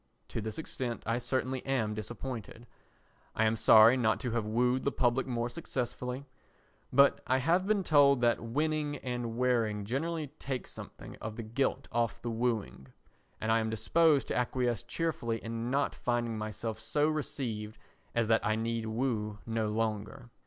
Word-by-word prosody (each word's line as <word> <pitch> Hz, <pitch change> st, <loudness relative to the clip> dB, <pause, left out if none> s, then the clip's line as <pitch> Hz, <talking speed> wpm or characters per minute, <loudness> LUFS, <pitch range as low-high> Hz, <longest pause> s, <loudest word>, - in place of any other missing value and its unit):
To -, -, -3 dB
this 110 Hz, 0 st, -4 dB
extent 125 Hz, -6 st, -3 dB
I 115 Hz, +2 st, 0 dB
certainly 130 Hz, +1 st, -2 dB
am 120 Hz, -6 st, 0 dB
disappointed. 115 Hz, +1 st, -6 dB, 0.7 s
I 110 Hz, -, +3 dB
am 110 Hz, +1 st, +2 dB
sorry 110 Hz, +2 st, +7 dB
not 110 Hz, -3 st, +2 dB
to 125 Hz, -3 st, -2 dB
have 115 Hz, -2 st, -1 dB
wooed 125 Hz, +3 st, +2 dB
the 140 Hz, -, +1 dB
public 125 Hz, +1 st, +1 dB
more 120 Hz, -2 st, -1 dB
successfully. 125 Hz, -1 st, -4 dB, 0.7 s
But 140 Hz, +2 st, +5 dB
I 130 Hz, -, +3 dB
have 170 Hz, +8 st, +2 dB
been 205 Hz, -2 st, +2 dB
told 140 Hz, -4 st, +5 dB
that 120 Hz, -1 st, +3 dB
winning 150 Hz, +4 st, -1 dB
and 120 Hz, -3 st, -4 dB
wearing 115 Hz, -5 st, +1 dB
generally 150 Hz, +6 st, -2 dB
take 130 Hz, -3 st, -3 dB
something -, -, -10 dB
of 110 Hz, 0 st, -6 dB
the 115 Hz, -, -5 dB
gilt 135 Hz, +4 st, -1 dB
off 120 Hz, -1 st, 0 dB
the 120 Hz, -, -4 dB
wooing, 110 Hz, -, -2 dB, 0.5 s
and 110 Hz, -, 0 dB
I 115 Hz, -, +4 dB
am 110 Hz, 0 st, -1 dB
disposed 150 Hz, +6 st, +3 dB
to -, -, -1 dB
acquiesce 125 Hz, -2 st, 0 dB
cheerfully 135 Hz, -9 st, -2 dB
in 115 Hz, +1 st, -4 dB
not 140 Hz, +2 st, +1 dB
finding 120 Hz, -2 st, -1 dB
myself 110 Hz, +1 st, -4 dB
so 145 Hz, +7 st, +1 dB
received 115 Hz, -8 st, -3 dB, 0.4 s
as 115 Hz, -2 st, +2 dB
that 115 Hz, 0 st, +3 dB
I 110 Hz, -, +2 dB
need 115 Hz, 0 st, -2 dB
woo 110 Hz, -3 st, -1 dB
no 115 Hz, -1 st, -1 dB
longer. 110 Hz, +2 st, -3 dB
120 Hz, 165 wpm, -31 LUFS, 110-130 Hz, 0.7 s, sorry